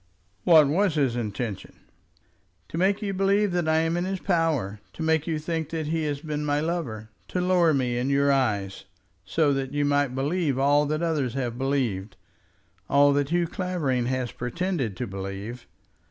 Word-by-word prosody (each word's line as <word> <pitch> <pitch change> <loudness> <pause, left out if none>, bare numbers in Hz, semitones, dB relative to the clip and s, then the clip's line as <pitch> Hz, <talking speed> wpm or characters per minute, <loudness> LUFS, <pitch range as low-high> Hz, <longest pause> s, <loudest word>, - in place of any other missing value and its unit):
"What 160 -4 +7
was 175 +3 +2
his 135 -5 +1
intention?" 110 -2 -4 0.9
"To - - -5
make 195 +3 +2
you 200 -1 -2
believe 195 +1 +2
that 175 -2 0
I 160 0 +3
am 165 +1 0
in 175 - 0
his 190 0 -2
power; 160 - 0
to 160 - -5
make 160 0 +1
you 160 -2 0
think 160 0 -3
that 160 -1 -3
he 160 +1 -1
has 145 -1 -2
been 150 -1 -3
my 145 0 +1
lover; 140 -10 -3 0.2
to 180 - -2
lower 180 -2 +3
me 125 -4 0
in 125 +2 -1
your 140 0 +3
eyes, 105 -9 0 0.4
so 145 - +2
that 135 0 -3
you 145 0 +1
might 145 -2 +1
believe 145 +1 0
all 145 +2 +3
that 155 +3 -1
others 145 -7 0
have 125 -3 -2
believed, 120 -7 -1 0.7
all 145 +1 +5
that 140 0 0
Hugh 175 +1 +2
Clavering 160 -9 -1
has 130 -1 -1
pretended 135 - -3
to 125 - -2
believe. 100 +4 -6
145 Hz, 180 wpm, -26 LUFS, 125-165 Hz, 0.9 s, What